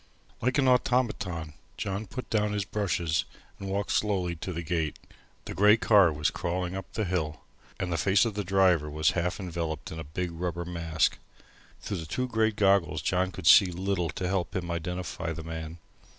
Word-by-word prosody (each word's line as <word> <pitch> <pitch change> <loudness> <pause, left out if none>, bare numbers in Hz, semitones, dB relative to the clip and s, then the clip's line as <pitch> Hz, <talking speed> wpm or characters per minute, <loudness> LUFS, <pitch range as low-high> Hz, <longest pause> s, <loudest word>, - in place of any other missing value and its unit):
Like 125 +3 +1
an 135 -2 +3
automaton 110 -11 +1 0.2
John 100 +1 -3
put 130 +7 -6
down 105 -1 +1
his 100 -2 -1
brushes, 85 -6 0 0.4
and 100 - -5
walked 100 +1 -1
slowly 95 -5 0
to 90 - -5
the 85 0 -4
gate. 80 -2 -1 0.5
The - - -5
grey 105 +2 +6
car 100 -6 +5
was 75 +1 0
crawling 90 +2 -2
up 95 -3 -7
the 110 - -1
hill, 80 -4 -2 0.4
and 90 -2 -2
the - - 0
face 100 +3 +4
of 115 - -2
the 105 0 -2
driver 90 -5 +3
was 75 0 +2
half 90 +2 -1
enveloped 85 -4 -4
in 80 - -6
a - - -4
big 85 +4 -4
rubber 85 0 -3
mask. 85 -2 0 0.6
Through 100 - -3
the 80 -2 -6
two 125 +10 -2
great 110 -2 +1
goggles 95 -7 +2
John 90 +2 +1
could 80 - -8
see 95 +5 +8
little 90 -1 -1
to 90 - -3
help 95 -1 -1
him 90 -2 -2
identify 85 -1 -3
the 80 0 -7
man. 80 0 -6
90 Hz, 190 wpm, -28 LUFS, 80-100 Hz, 0.6 s, see